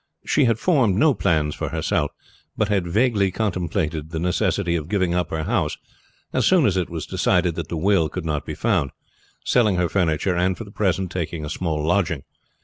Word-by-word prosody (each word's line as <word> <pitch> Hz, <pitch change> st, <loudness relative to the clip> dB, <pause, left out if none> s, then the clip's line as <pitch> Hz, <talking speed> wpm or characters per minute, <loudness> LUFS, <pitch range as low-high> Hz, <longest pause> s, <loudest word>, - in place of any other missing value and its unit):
She 145 Hz, -, +3 dB
had 115 Hz, -2 st, +2 dB
formed 125 Hz, -, +2 dB
no 150 Hz, +7 st, +4 dB
plans 75 Hz, -8 st, +1 dB
for -, -, -4 dB
herself, -, -, 0 dB, 0.5 s
but 105 Hz, -, +1 dB
had 95 Hz, -4 st, +1 dB
vaguely 105 Hz, +1 st, +2 dB
contemplated 85 Hz, -6 st, -2 dB
the 80 Hz, -, -5 dB
necessity 90 Hz, +1 st, 0 dB
of 80 Hz, -1 st, -3 dB
giving 95 Hz, -4 st, +1 dB
up 90 Hz, 0 st, 0 dB
her 80 Hz, -1 st, -2 dB
house -, -, 0 dB, 0.6 s
as -, -, +1 dB
soon 180 Hz, -6 st, +4 dB
as 95 Hz, -, +2 dB
it 90 Hz, -2 st, -1 dB
was 80 Hz, -3 st, -5 dB
decided 90 Hz, -2 st, +1 dB
that 85 Hz, 0 st, -5 dB
the 85 Hz, -, -4 dB
will 85 Hz, -2 st, +2 dB
could 90 Hz, -3 st, -5 dB
not 75 Hz, -2 st, -1 dB
be 75 Hz, -, -6 dB
found, 90 Hz, -6 st, +1 dB, 0.6 s
selling 110 Hz, -6 st, +3 dB
her 90 Hz, -1 st, +1 dB
furniture, 90 Hz, -1 st, +1 dB
and 90 Hz, +1 st, +1 dB
for -, -, -6 dB
the 100 Hz, -, -13 dB
present 95 Hz, -3 st, 0 dB
taking 85 Hz, -3 st, -3 dB
a 75 Hz, -, -5 dB
small 80 Hz, -4 st, -2 dB
lodging. 85 Hz, -4 st, +1 dB
90 Hz, 200 wpm, -22 LUFS, 80-100 Hz, 0.6 s, no